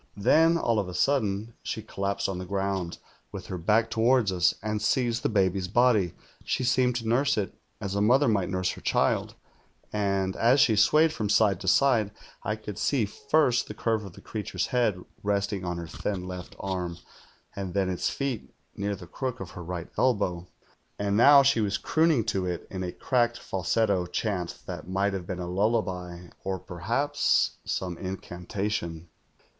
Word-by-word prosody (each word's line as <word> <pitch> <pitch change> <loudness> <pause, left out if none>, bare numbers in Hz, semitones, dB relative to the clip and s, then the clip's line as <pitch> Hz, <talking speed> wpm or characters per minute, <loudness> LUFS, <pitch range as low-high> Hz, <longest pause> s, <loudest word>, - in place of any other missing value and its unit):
Then, 165 +11 +4
all 115 -8 +1
of 100 - -2
a 90 - -7
sudden, 110 0 +1
she 110 - -4
collapsed 100 -2 -2
on 95 -2 -3
the 90 - -5
ground, 95 -2 -2 0.3
with - - -7
her 95 - -5
back 110 +6 +2
toward 115 -2 +3
us, 90 -2 +2
and 105 -1 -2
seized 120 +1 +1
the 145 - 0
baby's 95 -3 +1
body. 105 -4 +3 0.3
She - - -1
seemed 125 -1 +2
to 115 -2 -3
nurse 135 +4 +2
it, 100 -2 -1 0.3
as 100 - -4
a 100 - 0
mother 130 +7 +4
might 100 -5 +1
nurse 95 -1 0
her - - -10
child; - - +1 0.6
and 100 -2 0
as 125 +5 +4
she 130 -6 +5
swayed 155 +9 +4
from 105 -2 -2
side 105 -3 +3
to 95 - -7
side, 115 -1 +4 0.3
I 110 - -2
could 105 -2 -8
see 130 -7 +2
first 140 +3 +1
the - - -7
curve 110 -2 0
of 95 -4 -9
the - - -13
creature's 110 -2 -3
head, 120 -7 +1 0.2
resting 100 -1 -1
on 90 -1 -3
her 85 - -5
thin 90 +3 -4
left 90 -1 -7
arm, 90 -3 -3 0.6
and 95 -2 -5
then 95 -2 +2
its 90 -1 -1
feet 135 -5 -3 0.2
near 100 0 -2
the 90 - -11
crook 125 +6 -4
of 90 - -7
her 90 - -8
right 85 0 -5
elbow. 95 -8 +1 0.5
And 100 0 0
now 140 +5 +8
she 135 -4 +3
was 100 -2 0
crooning 160 -6 +2
to 95 -4 -1
it 90 -1 -3
in 95 - -4
a 90 - -3
cracked 120 +1 +1
false+to 95 -1 0
chant 95 -6 -2
that - - -7
might 95 +2 +1
have 90 -3 -4
been 90 - -3
a 90 - -4
lullaby 90 -3 -1
or 95 0 -2
perhaps 115 +13 0
some 90 -2 -3
incantation. 90 -2 -4
100 Hz, 180 wpm, -27 LUFS, 95-115 Hz, 0.6 s, now